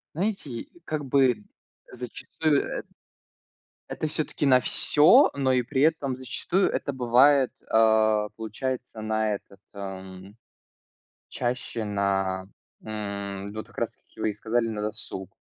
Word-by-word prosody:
Знаете, 170 - -3 0.2
как 155 -3 -3
бы, 130 -5 +3 0.5
зачастую 140 +5 -1 0.2
эт - - -7 1.0
это 155 - -2
всё-таки 150 -1 -2
на 130 -2 +6
всё, 160 - +5
но 135 -2 +1
и 125 -1 +3
при 130 +2 -1
этом 145 -4 +2
зачастую 150 +9 0
это 140 - -2
бывает, 130 +2 +4
э, 110 -1 +3
получается 115 +2 -4
на 110 0 0
этот, 100 -1 -11
м, 95 0 -8 0.9
чаще 120 -2 -3
на, 95 -2 0 0.4
м, 100 -2 -5
вот 110 0 -5
как - - -10
раз-таки - - -6
вы - - +2
и - - -11
сказали, 115 +2 0
на 105 -2 -3
досуг. 105 -3 -6
115 Hz, 125 wpm, -26 LUFS, 105-135 Hz, 1.0 s, на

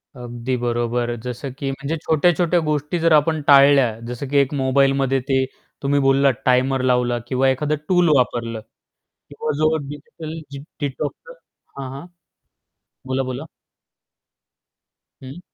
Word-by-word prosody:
अगदी 120 +1 -4
बरोबर. 120 0 -1
जसं 125 +2 -5
की 135 - -3
म्हणजे 140 +4 -4
छोट्या-छोट्या 175 +2 +2
गोष्टी 150 +3 -1
जर 165 0 +2
आपण 155 +1 +3
टाळल्या. 140 -5 +6
जसं 125 +3 -5
की 145 - +1
एक 140 +1 +2
मोबाईलमध्ये 135 0 +2
ते 130 0 +2 0.4
तुम्ही 140 +1 +2
बोललात 135 0 +4
टायमर 130 +1 +2
लावला 125 -1 +2
किंवा 130 0 +2
एखादं 150 +3 0
टूल 180 -3 +4
वापरलं 115 -3 0 0.7
किंवा 150 +1 -3
जो 155 +1 +2
डिजिटल 155 +3 -8 0.4
डिटॉक्स 145 - -5 0.4
हां, 130 -1 -5
हां. 140 +5 -8 1.0
बोला-बोला. 130 +2 -3 1.8
हं. 135 +6 -9
135 Hz, 120 wpm, -21 LUFS, 125-150 Hz, 1.8 s, टाळल्या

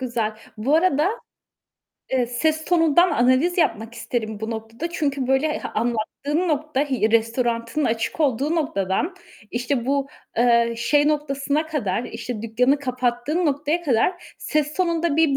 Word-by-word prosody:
güzel. 235 -4 -1 0.2
Bu 255 +8 +1
arada, 330 0 +3 1.0
eee, 255 -2 +2
ses 315 +6 0
tonundan 345 0 +4
analiz 260 +9 +2
yapmak 230 -8 0
isterim 220 -3 -4
bu 220 +1 -3
noktada 225 +8 -5
çünkü 280 -5 -1
böyle 265 +3 +2
e 305 - -2
anlattığın 240 +9 -1
nokta 300 -2 0
i 260 -7 0
restoranının 230 +4 0
açık 225 +7 -1
olduğu 280 +2 +1
noktadan, 285 - -1 0.4
işte 245 +1 -1
bu, 275 0 0 0.3
eee, 235 0 +3
şey 290 +5 +3
noktasına 295 0 0
kadar, 245 -8 -2
işte, 225 -1 -6
dükkânı 250 +5 +2
kapattığın 255 +5 -1
noktaya 295 +4 0
kadar 310 +5 0
ses 300 0 -1
tonunda 335 -4 0
bir 315 -4 +3
270 Hz, 135 wpm, -23 LUFS, 235-305 Hz, 1.0 s, tonundan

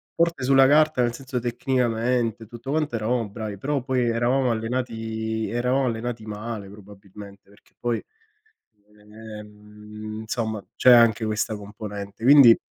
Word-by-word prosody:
Forte 170 -5 +1
sulla 135 +1 +5
carta 155 -1 +4
nel 120 -1 +1
senso 130 0 -5
tecnicamente, 120 -2 -1
tutto 120 +3 -10
quanto 150 -3 -1
eravamo 115 +1 -1
bravi, 105 -1 -6
però 140 +6 -2
poi 130 -1 0
eravamo 120 +2 +1
allenati 110 -1 -3
eravamo 125 +3 0
allenati 115 -1 -3
male 105 -1 -6
probabilmente, 100 0 -14
perché 100 - -24
poi, 120 -1 -1 1.0
ehm 105 0 -10
insomma 110 -2 -3
c'è 125 - +6
anche 115 -2 +5
questa 110 0 -1
componente, 105 0 -8
quindi 130 -3 +8
115 Hz, 125 wpm, -24 LUFS, 105-125 Hz, 1.0 s, quindi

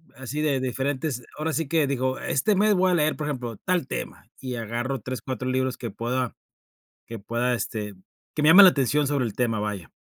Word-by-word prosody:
así 130 +3 -5
de 145 -4 +1
diferentes 130 +1 -2 0.2
ahora 155 +1 -1
sí 160 -1 -1
que 160 0 +2
digo: 130 -1 -1
"Este 205 +10 +1
mes 210 +2 +4
voy 185 0 +3
a - - +2
leer, 155 -2 +1
por 150 - -3
ejemplo, 120 -6 -4
tal 180 -7 +1
tema", - - -6
y 130 -2 -5
agarro 120 +3 -3
3, 125 +1 -5
4 130 0 -4
libros 130 0 0
que 120 - -5
pueda 120 +3 -2 0.7
que 115 -1 -7
pueda, 120 +4 -1
este 105 -3 -3 0.4
que 150 - -2
me 150 - +4
llamen 190 +5 +10
la 185 - +8
atención 145 +1 +1
sobre 140 -2 0
el 110 - -5
tema, 115 -3 0
vaya. 105 -5 -4
130 Hz, 210 wpm, -25 LUFS, 120-150 Hz, 0.7 s, llamen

